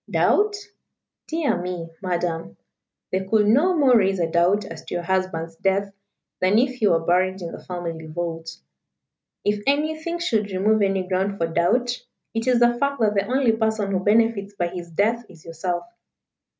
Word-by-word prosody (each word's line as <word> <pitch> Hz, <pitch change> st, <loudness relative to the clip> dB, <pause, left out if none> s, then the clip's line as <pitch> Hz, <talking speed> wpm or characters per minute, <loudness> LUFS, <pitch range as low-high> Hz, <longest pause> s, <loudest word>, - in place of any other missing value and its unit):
Doubt? 415 Hz, 0 st, +3 dB, 0.7 s
Dear 305 Hz, -, 0 dB
me, 175 Hz, -2 st, -5 dB
Madam, 175 Hz, -3 st, -2 dB, 0.5 s
they 190 Hz, +1 st, 0 dB
could 210 Hz, +2 st, +2 dB
no 305 Hz, -, +4 dB
more 270 Hz, -4 st, +5 dB
raise 195 Hz, -3 st, +3 dB
a 170 Hz, -, +2 dB
doubt 175 Hz, +5 st, +2 dB
as 165 Hz, -4 st, -9 dB
to -, -, -5 dB
your 175 Hz, -, -2 dB
husband's 170 Hz, -3 st, -2 dB
death 195 Hz, +2 st, 0 dB, 0.5 s
than 185 Hz, +3 st, +3 dB
if 255 Hz, +2 st, +2 dB
he 215 Hz, -, +3 dB
were 165 Hz, -3 st, +2 dB
buried 185 Hz, +2 st, +2 dB
in 170 Hz, -2 st, -6 dB
the -, -, -9 dB
family 170 Hz, -3 st, -5 dB
vault. 165 Hz, 0 st, -5 dB, 0.9 s
If 205 Hz, 0 st, +1 dB
anything 315 Hz, +4 st, 0 dB
should 220 Hz, -, 0 dB
remove 205 Hz, +3 st, +2 dB
any 195 Hz, -2 st, +1 dB
ground 190 Hz, +2 st, -1 dB
for 165 Hz, -, +1 dB
doubt, 235 Hz, +10 st, +1 dB, 0.3 s
it 225 Hz, +2 st, -2 dB
is 250 Hz, -2 st, +4 dB
the 240 Hz, 0 st, +4 dB
fact 280 Hz, 0 st, 0 dB
that 215 Hz, -2 st, +3 dB
the 200 Hz, -1 st, 0 dB
only 255 Hz, -1 st, +3 dB
person 220 Hz, -2 st, 0 dB
who 190 Hz, -, +1 dB
benefits 205 Hz, 0 st, +2 dB
by 175 Hz, -3 st, -1 dB
his 175 Hz, -1 st, -7 dB
death 220 Hz, +8 st, +1 dB
is 170 Hz, -4 st, -16 dB
yourself. 175 Hz, +1 st, -3 dB
195 Hz, 175 wpm, -23 LUFS, 175-230 Hz, 0.9 s, more